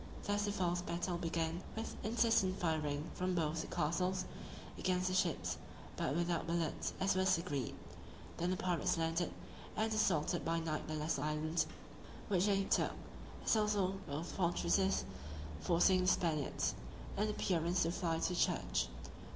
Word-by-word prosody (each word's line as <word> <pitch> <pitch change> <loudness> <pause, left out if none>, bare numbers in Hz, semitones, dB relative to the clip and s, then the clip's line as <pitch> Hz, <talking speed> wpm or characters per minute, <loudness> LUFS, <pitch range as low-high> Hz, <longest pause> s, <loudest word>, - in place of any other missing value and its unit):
Thus 205 0 +1
the 205 - 0
false 175 -3 0
battle 175 0 -2
began, 165 0 -1
with 225 - -4
incessant 220 -4 +3
firing 155 -3 -1
from 185 0 -1
both 160 -1 +1
the - - -6
castles, 185 +3 0 0.5
against 185 0 +1
the - - -1
ships, 150 - +1 0.4
but 135 - 0
without 170 -1 0
bullets, 165 -2 0
as 190 +1 +3
was 185 0 +4
agreed. 145 -8 -2 0.6
Then 175 +1 0
the 185 - 0
pirates 175 -3 +1
landed, 165 +1 0 0.5
and 220 +1 +1
assaulted 180 -5 +2
by 165 0 +1
night 160 -2 -2
the 155 - -2
lesser 150 -2 -1
island, 155 +2 0 0.6
which 190 0 +3
they 195 -1 +3
took, - - +2 0.5
as - - +4
also 205 -3 +2
both 150 +4 -3
fortresses; 190 +2 +2 0.5
forcing 180 +2 +4
the 180 - +1
Spaniards, 160 -6 +1 0.4
in 210 +2 +1
appearance, 180 -3 +1
to 165 - +1
fly 170 -2 0
to - - +1
the 180 - -2
church. - - +1
175 Hz, 150 wpm, -36 LUFS, 165-190 Hz, 0.6 s, was